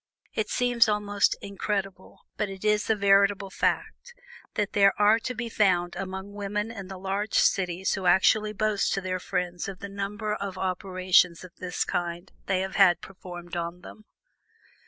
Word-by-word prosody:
It 215 Hz, -, -2 dB
seems 245 Hz, -2 st, +3 dB
almost 205 Hz, -1 st, +1 dB
incredible, 195 Hz, -1 st, -4 dB
but 210 Hz, -, -2 dB
it 195 Hz, +1 st, -8 dB
is 210 Hz, 0 st, +2 dB
a 220 Hz, -, +4 dB
veritable 200 Hz, -1 st, +3 dB
fact, 485 Hz, -, -2 dB, 0.4 s
that 210 Hz, -1 st, -1 dB
there 200 Hz, -1 st, +4 dB
are 210 Hz, +2 st, +5 dB
to 250 Hz, +2 st, -4 dB
be 235 Hz, +1 st, -3 dB
found 180 Hz, -6 st, +1 dB
many 190 Hz, 0 st, -5 dB
women 205 Hz, +2 st, -3 dB
in 200 Hz, -5 st, -8 dB
the 190 Hz, 0 st, -8 dB
large 195 Hz, +3 st, -3 dB
cities 185 Hz, -1 st, +2 dB
who 190 Hz, -2 st, -2 dB
actually 210 Hz, +4 st, +4 dB
boast 215 Hz, -1 st, 0 dB
to 195 Hz, -, -1 dB
their 185 Hz, 0 st, -2 dB
friends 180 Hz, -1 st, -3 dB
of 195 Hz, -1 st, -6 dB
the 200 Hz, +1 st, -8 dB
number 205 Hz, +2 st, -3 dB
of 200 Hz, -2 st, -5 dB
operations 185 Hz, -2 st, +2 dB
of 185 Hz, -, -11 dB
this 180 Hz, -1 st, -2 dB
kind 175 Hz, +1 st, -3 dB, 0.2 s
they 190 Hz, -1 st, +1 dB
have 190 Hz, 0 st, -4 dB
had 180 Hz, -4 st, +6 dB
performed 175 Hz, -2 st, -9 dB
on 170 Hz, +1 st, -4 dB
them. 215 Hz, +3 st, -13 dB
195 Hz, 170 wpm, -27 LUFS, 185-210 Hz, 0.4 s, had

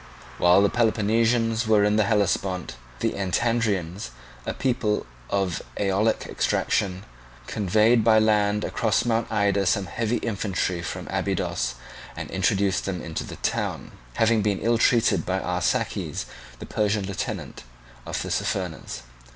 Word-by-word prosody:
While 90 Hz, +3 st, +6 dB
the 100 Hz, -, +4 dB
Peloponnesians 115 Hz, 0 st, +2 dB
were 105 Hz, -2 st, +5 dB
in 105 Hz, 0 st, +3 dB
the 110 Hz, -1 st, +3 dB
Hellespont, 95 Hz, -, 0 dB, 0.3 s
the -, -, +1 dB
Antandrians, 100 Hz, -, 0 dB, 0.4 s
a -, -, -1 dB
people 120 Hz, -5 st, 0 dB, 0.2 s
of 95 Hz, -4 st, 0 dB, 0.2 s
Aeolic 100 Hz, +3 st, +1 dB
extraction, 95 Hz, 0 st, 0 dB, 0.4 s
conveyed 110 Hz, +3 st, +3 dB
by 110 Hz, 0 st, +5 dB
land 105 Hz, -1 st, +3 dB
across 110 Hz, -1 st, +1 dB
Mount 115 Hz, -1 st, 0 dB
Ida 100 Hz, -2 st, +2 dB
some 95 Hz, +2 st, +2 dB
heavy 115 Hz, +5 st, -1 dB
infantry 95 Hz, -5 st, -2 dB
from -, -, -5 dB
Abydos, 60 Hz, 0 st, -1 dB, 0.4 s
and -, -, -6 dB
introduced 95 Hz, +1 st, +1 dB
them 95 Hz, -2 st, -2 dB
into 80 Hz, -1 st, -4 dB
the -, -, -8 dB
town; -, -, -2 dB, 0.2 s
having 115 Hz, -1 st, +3 dB
been 100 Hz, -1 st, +1 dB
ill 115 Hz, +1 st, +2 dB
treated 115 Hz, -8 st, +3 dB
by 95 Hz, +1 st, -1 dB
Arsaces, 90 Hz, -2 st, -1 dB, 0.3 s
the -, -, -8 dB
Persian 105 Hz, -1 st, 0 dB
lieutenant 100 Hz, 0 st, -5 dB, 0.5 s
of -, -, -3 dB
Tissaphernes. 90 Hz, -9 st, -3 dB
105 Hz, 130 wpm, -25 LUFS, 95-110 Hz, 0.5 s, While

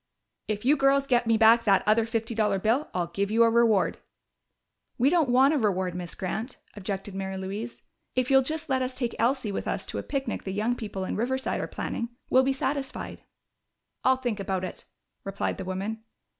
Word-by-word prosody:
"If 210 Hz, +1 st, -3 dB
you 290 Hz, +3 st, +5 dB
girls 275 Hz, 0 st, +3 dB
get 245 Hz, -3 st, +2 dB
me 225 Hz, -1 st, +4 dB
back 225 Hz, +1 st, +6 dB
that 195 Hz, -3 st, +4 dB
other 220 Hz, +2 st, +3 dB
fifty 225 Hz, 0 st, -2 dB
dollar 210 Hz, -3 st, +1 dB
bill, 225 Hz, +9 st, +1 dB
I'll 180 Hz, -1 st, -1 dB
give 195 Hz, +4 st, -2 dB
you 225 Hz, +2 st, +4 dB
a 230 Hz, -, +4 dB
reward." 225 Hz, -4 st, +3 dB, 1.0 s
"We 260 Hz, +4 st, +3 dB
don't 330 Hz, -6 st, +3 dB
want 265 Hz, +4 st, +5 dB
a 300 Hz, -, +2 dB
reward, 190 Hz, -5 st, 0 dB
Miss 180 Hz, -1 st, -4 dB
Grant," 220 Hz, +7 st, -4 dB, 0.2 s
objected 195 Hz, -1 st, -4 dB
Mary 190 Hz, 0 st, -4 dB
Louise. 200 Hz, +5 st, -6 dB, 0.3 s
"If 255 Hz, +1 st, +1 dB
you'll 270 Hz, 0 st, +7 dB
just 310 Hz, +4 st, -3 dB
let 265 Hz, -1 st, +1 dB
us 255 Hz, 0 st, -2 dB
take 240 Hz, -3 st, -1 dB
Elsie 240 Hz, -1 st, +1 dB
with -, -, -4 dB
us -, -, -2 dB
to -, -, -4 dB
a -, -, -2 dB
picnic 270 Hz, -4 st, -3 dB
the 190 Hz, -, -4 dB
young 220 Hz, +5 st, 0 dB
people 205 Hz, -5 st, -5 dB
in -, -, -3 dB
Riverside 260 Hz, +4 st, -1 dB
are -, -, -3 dB
planning, 235 Hz, -, -4 dB, 0.2 s
we'll 260 Hz, -, +6 dB
be 265 Hz, +1 st, +1 dB
satisfied." 270 Hz, 0 st, -3 dB, 0.8 s
"I'll 260 Hz, 0 st, +4 dB
think 240 Hz, -5 st, -3 dB
about 190 Hz, -2 st, -2 dB
it," 185 Hz, -, -6 dB, 0.4 s
replied 195 Hz, 0 st, -3 dB
the -, -, -4 dB
woman. 200 Hz, +4 st, -4 dB
225 Hz, 200 wpm, -27 LUFS, 195-260 Hz, 1.0 s, you'll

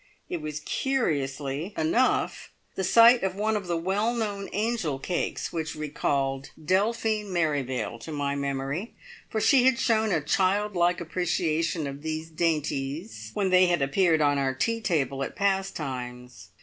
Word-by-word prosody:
It 175 Hz, -, -2 dB
was 155 Hz, 0 st, -5 dB
curiously 150 Hz, -, -1 dB
enough 200 Hz, +12 st, +1 dB, 0.2 s
the 190 Hz, -, -3 dB
sight 235 Hz, +5 st, +7 dB
of 190 Hz, -1 st, -1 dB
one 215 Hz, +2 st, 0 dB
of 200 Hz, -3 st, -3 dB
the 170 Hz, -1 st, 0 dB
well 200 Hz, +7 st, 0 dB
known 205 Hz, -4 st, -3 dB
angel 210 Hz, -, -1 dB
cakes 175 Hz, +6 st, -3 dB
which 160 Hz, -1 st, -3 dB
recalled 140 Hz, -3 st, -1 dB, 0.2 s
Delphine 215 Hz, +4 st, +1 dB
Merrivale 145 Hz, -8 st, -1 dB
to 135 Hz, -, -8 dB
my 145 Hz, -2 st, -1 dB
memory, 140 Hz, -, -3 dB, 0.3 s
for 220 Hz, -, -1 dB
she 255 Hz, +3 st, +5 dB
had 260 Hz, -2 st, +4 dB
shown 220 Hz, -2 st, +2 dB
a 165 Hz, -, +2 dB
child 190 Hz, +7 st, +1 dB
like 175 Hz, 0 st, +2 dB
appreciation 165 Hz, -2 st, -1 dB
of 140 Hz, 0 st, -6 dB
these 160 Hz, +1 st, -4 dB
dainties 155 Hz, +2 st, -2 dB
when 195 Hz, -3 st, +1 dB
they 185 Hz, 0 st, +6 dB
had 175 Hz, -5 st, +2 dB
appeared 160 Hz, +3 st, +3 dB
on 145 Hz, -1 st, +3 dB
our 135 Hz, -1 st, 0 dB
tea 230 Hz, +12 st, 0 dB
table 140 Hz, -, 0 dB
at -, -, -6 dB
"Pastimes". 130 Hz, -11 st, -3 dB
165 Hz, 150 wpm, -27 LUFS, 140-200 Hz, 0.3 s, sight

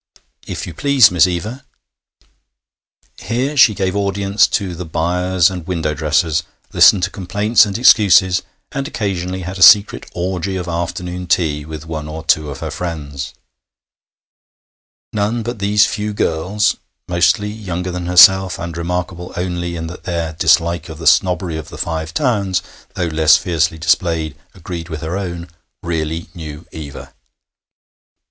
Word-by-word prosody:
'If -, -, -5 dB
you 85 Hz, -, -8 dB
please, 135 Hz, -, +4 dB
Miss 90 Hz, 0 st, +4 dB
Eva 105 Hz, +9 st, -4 dB, 1.0 s
'. -, -, -43 dB
Here 130 Hz, +6 st, -2 dB
she 125 Hz, -6 st, +6 dB
gave 95 Hz, -1 st, -1 dB
audience 100 Hz, 0 st, +1 dB
to 95 Hz, -3 st, -2 dB
the 90 Hz, +2 st, -6 dB
'buyers' 90 Hz, +2 st, +1 dB
and 90 Hz, -3 st, -7 dB
window 80 Hz, -4 st, -1 dB
dressers, 75 Hz, +2 st, +1 dB, 0.3 s
listened 95 Hz, -, +6 dB
to -, -, 0 dB
complaints 105 Hz, +4 st, +2 dB
and 100 Hz, -, -3 dB
excuses, 95 Hz, -6 st, +5 dB, 0.3 s
and 135 Hz, 0 st, -3 dB
occasionally 95 Hz, -, -3 dB
had 90 Hz, +2 st, -6 dB
a -, -, -6 dB
secret 100 Hz, +4 st, +6 dB
orgy 95 Hz, +1 st, -2 dB
of 90 Hz, -2 st, -4 dB
afternoon 90 Hz, +1 st, -4 dB
tea 75 Hz, -4 st, 0 dB
with 80 Hz, 0 st, -8 dB
one 80 Hz, -2 st, -5 dB
or 80 Hz, +1 st, -7 dB
two 80 Hz, -4 st, +2 dB
of 70 Hz, -1 st, -8 dB
her 80 Hz, -1 st, -4 dB
friends. 75 Hz, -4 st, -6 dB, 1.8 s
None 110 Hz, +3 st, -1 dB
but 120 Hz, 0 st, -5 dB
these 100 Hz, +1 st, +3 dB
few 105 Hz, 0 st, -3 dB
girls 95 Hz, +5 st, 0 dB, 0.3 s
mostly 90 Hz, +4 st, +2 dB
younger 90 Hz, -4 st, -5 dB
than 90 Hz, -1 st, -5 dB
herself, 95 Hz, +1 st, +6 dB
and 85 Hz, -1 st, -6 dB
remarkable 90 Hz, +1 st, -4 dB
only 90 Hz, -1 st, -3 dB
in 80 Hz, -1 st, -5 dB
that 85 Hz, +2 st, -9 dB
their 85 Hz, -3 st, -3 dB
dislike 85 Hz, +1 st, +1 dB
of 80 Hz, -, -8 dB
the 80 Hz, -, -8 dB
snobbery 90 Hz, 0 st, +2 dB
of 80 Hz, -, -8 dB
the -, -, -10 dB
Five 80 Hz, -1 st, -3 dB
Towns, 100 Hz, -, 0 dB, 0.3 s
though 90 Hz, -, -1 dB
less 80 Hz, -1 st, +4 dB
fiercely 80 Hz, -2 st, -1 dB
displayed, 80 Hz, -1 st, 0 dB, 0.2 s
agreed 85 Hz, -2 st, -7 dB
with 80 Hz, -2 st, -6 dB
her 80 Hz, +3 st, -4 dB
own 85 Hz, -3 st, -5 dB, 0.4 s
really 80 Hz, -1 st, -3 dB
knew 80 Hz, -2 st, -9 dB
Eva. 75 Hz, -3 st, -9 dB
90 Hz, 150 wpm, -17 LUFS, 80-95 Hz, 1.8 s, she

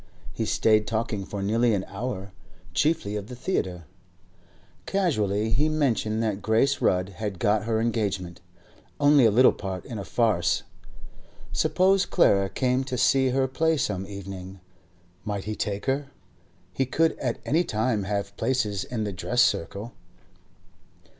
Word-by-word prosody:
He -, -, -2 dB
stayed 110 Hz, -1 st, +2 dB
talking 110 Hz, -3 st, -2 dB
for 100 Hz, 0 st, -5 dB
nearly 115 Hz, +2 st, +2 dB
an 95 Hz, -, -2 dB
hour, 100 Hz, -2 st, -5 dB, 0.4 s
chiefly 145 Hz, -10 st, +1 dB
of 105 Hz, -1 st, -4 dB
the 125 Hz, -, -8 dB
theatre. 95 Hz, -, -2 dB, 1.0 s
Casually 110 Hz, -, 0 dB
he 145 Hz, +8 st, +2 dB
mentioned 115 Hz, -7 st, 0 dB
that 105 Hz, -2 st, -1 dB
Grace 115 Hz, +6 st, +2 dB
Rudd 90 Hz, +1 st, +2 dB
had 100 Hz, 0 st, -5 dB
got 105 Hz, +1 st, +1 dB
her 110 Hz, -1 st, 0 dB
engagement—only 105 Hz, +5 st, 0 dB
a -, -, +5 dB
little 125 Hz, +5 st, +6 dB
part 95 Hz, -2 st, -6 dB
in 115 Hz, -5 st, -6 dB
a -, -, -4 dB
farce. 105 Hz, -6 st, +1 dB, 0.9 s
Suppose 190 Hz, +1 st, +3 dB
Clara 95 Hz, -1 st, +3 dB
came 130 Hz, +3 st, 0 dB
to 130 Hz, -1 st, -3 dB
see 130 Hz, +1 st, +3 dB
her 130 Hz, +1 st, +1 dB
play 160 Hz, +4 st, +1 dB
some 95 Hz, -7 st, -2 dB
evening? 95 Hz, -1 st, -8 dB, 0.6 s
Might 100 Hz, -2 st, -3 dB
he 110 Hz, +1 st, -4 dB
take 100 Hz, -1 st, -3 dB
her? 135 Hz, +1 st, 0 dB, 0.7 s
He 135 Hz, -, 0 dB
could 165 Hz, +4 st, +2 dB
at 125 Hz, -3 st, -1 dB
any 165 Hz, +5 st, +2 dB
time 110 Hz, -5 st, 0 dB
have 100 Hz, 0 st, -3 dB
places 105 Hz, -7 st, 0 dB
in 115 Hz, 0 st, -3 dB
the 105 Hz, -2 st, -3 dB
dress 120 Hz, +7 st, +2 dB
circle. 100 Hz, +7 st, -1 dB
110 Hz, 145 wpm, -26 LUFS, 100-130 Hz, 1.0 s, little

